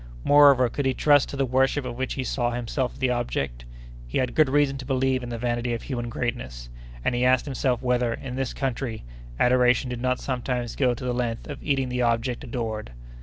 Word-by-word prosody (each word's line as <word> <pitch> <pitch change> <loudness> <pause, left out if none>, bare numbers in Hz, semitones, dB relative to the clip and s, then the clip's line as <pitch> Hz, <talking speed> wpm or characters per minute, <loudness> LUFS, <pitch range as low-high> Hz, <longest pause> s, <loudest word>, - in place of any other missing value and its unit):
Moreover, 140 -3 +6
could 135 +3 -2
he 130 - +1
trust 145 -2 +4
to - - -6
the 135 - +2
worship 130 +2 +1
of 120 -1 -5
which 130 +1 -3
he 135 - -2
saw 120 0 0
himself 120 +2 -2
the 130 -1 +1
object? 70 - -2 0.4
He - - -2
had 125 -2 0
good 155 -4 +4
reason 145 0 +2
to 130 - -7
believe 130 -1 +1
in 120 - -6
the 120 - -4
vanity 120 0 -1
of 115 - -7
human 120 -3 -4
greatness; 65 - -4 0.4
and - - +2
he 120 +1 0
asked 130 -1 +3
himself 130 -3 -1
whether, 125 -1 +1
in 125 +2 -5
this 135 -2 -2
country, 130 -4 -3 0.4
adoration 125 0 +3
did 120 -1 -4
not 130 0 0
sometimes 125 -2 -3
go 125 -3 +2
to 125 - -9
the 125 - 0
length 120 -2 -2
of 145 - -7
eating 135 -3 0
the 125 0 -1
object 120 +1 0
adored! 110 - -4
125 Hz, 215 wpm, -25 LUFS, 120-130 Hz, 0.4 s, Moreover